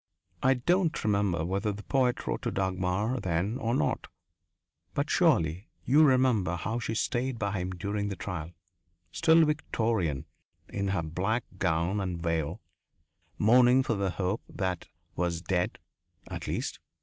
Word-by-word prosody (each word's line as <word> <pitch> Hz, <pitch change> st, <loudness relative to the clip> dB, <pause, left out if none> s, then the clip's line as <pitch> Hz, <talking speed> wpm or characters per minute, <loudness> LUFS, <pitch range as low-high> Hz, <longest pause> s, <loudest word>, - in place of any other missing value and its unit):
I 135 Hz, 0 st, +4 dB
don't 175 Hz, +6 st, +1 dB
remember 100 Hz, -6 st, +1 dB
whether 100 Hz, +4 st, -1 dB
the 105 Hz, +1 st, -7 dB
poet 130 Hz, -3 st, +1 dB
wrote -, -, -2 dB
to -, -, -2 dB
Dagmar 95 Hz, +5 st, 0 dB
then 95 Hz, +4 st, -1 dB
or 115 Hz, -3 st, 0 dB
not. 75 Hz, -, 0 dB, 0.9 s
But 145 Hz, +2 st, 0 dB
surely 95 Hz, -, +2 dB, 0.2 s
you 145 Hz, +5 st, +6 dB
remember 125 Hz, -, +3 dB
how 110 Hz, +7 st, -2 dB
she 115 Hz, -1 st, -3 dB
stayed 125 Hz, +2 st, -1 dB
by 100 Hz, -2 st, -1 dB
him 90 Hz, +1 st, -2 dB
during 100 Hz, +3 st, -2 dB
the 100 Hz, -, -3 dB
trial 90 Hz, -7 st, -5 dB, 0.6 s
still 165 Hz, -, +5 dB
Victorian 110 Hz, -, 0 dB, 0.4 s
in 100 Hz, 0 st, -2 dB
her 95 Hz, -4 st, 0 dB
black 95 Hz, +9 st, -1 dB, 0.2 s
gown 85 Hz, +3 st, +1 dB
and 90 Hz, -3 st, -3 dB
veil, 80 Hz, -3 st, -1 dB, 0.8 s
mourning 125 Hz, +4 st, +5 dB
for 120 Hz, -, 0 dB
the 100 Hz, -2 st, 0 dB
hope 95 Hz, +3 st, -1 dB
that 95 Hz, -2 st, -3 dB, 0.3 s
was 85 Hz, -1 st, -1 dB
dead, 90 Hz, 0 st, -1 dB, 0.5 s
at -, -, -5 dB
least! -, -, -3 dB
100 Hz, 145 wpm, -29 LUFS, 90-120 Hz, 0.9 s, you